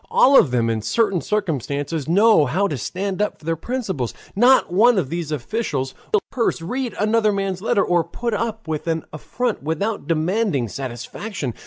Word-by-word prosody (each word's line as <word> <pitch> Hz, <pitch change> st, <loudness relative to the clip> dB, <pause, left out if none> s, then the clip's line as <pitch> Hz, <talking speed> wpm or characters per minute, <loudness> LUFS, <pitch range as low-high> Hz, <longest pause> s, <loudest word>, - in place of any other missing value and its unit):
All 275 Hz, +2 st, +5 dB
of 160 Hz, -, +7 dB
them 120 Hz, -2 st, +1 dB
in 115 Hz, -1 st, -1 dB
certain 195 Hz, -, +1 dB
circumstances 150 Hz, -, -2 dB
know 200 Hz, -, +5 dB
how 185 Hz, +10 st, +1 dB
to 150 Hz, -, -3 dB
stand 190 Hz, -, -3 dB
up 210 Hz, -, -1 dB
for -, -, -18 dB
their 165 Hz, 0 st, 0 dB
principles. 190 Hz, -, -3 dB, 0.2 s
Not 245 Hz, -3 st, +4 dB
one 230 Hz, +4 st, +5 dB
of 150 Hz, -8 st, -1 dB
these 170 Hz, -3 st, -3 dB
officials 145 Hz, -, -2 dB
would -, -, -27 dB
steal 430 Hz, -, +3 dB
a -, -, -21 dB
purse, 230 Hz, -6 st, +1 dB
read 245 Hz, +8 st, -3 dB
another 215 Hz, 0 st, +3 dB
man's 195 Hz, -2 st, -2 dB
letter, 210 Hz, -1 st, +2 dB
or 175 Hz, -1 st, +2 dB
put 235 Hz, +7 st, -4 dB
up 225 Hz, -2 st, -3 dB
with 155 Hz, +1 st, -3 dB
an 165 Hz, -2 st, -1 dB
affront 235 Hz, +9 st, -3 dB
without 165 Hz, +9 st, -2 dB
demanding 165 Hz, -, 0 dB
satisfaction. 130 Hz, -, -5 dB
185 Hz, 185 wpm, -21 LUFS, 150-220 Hz, 0.2 s, of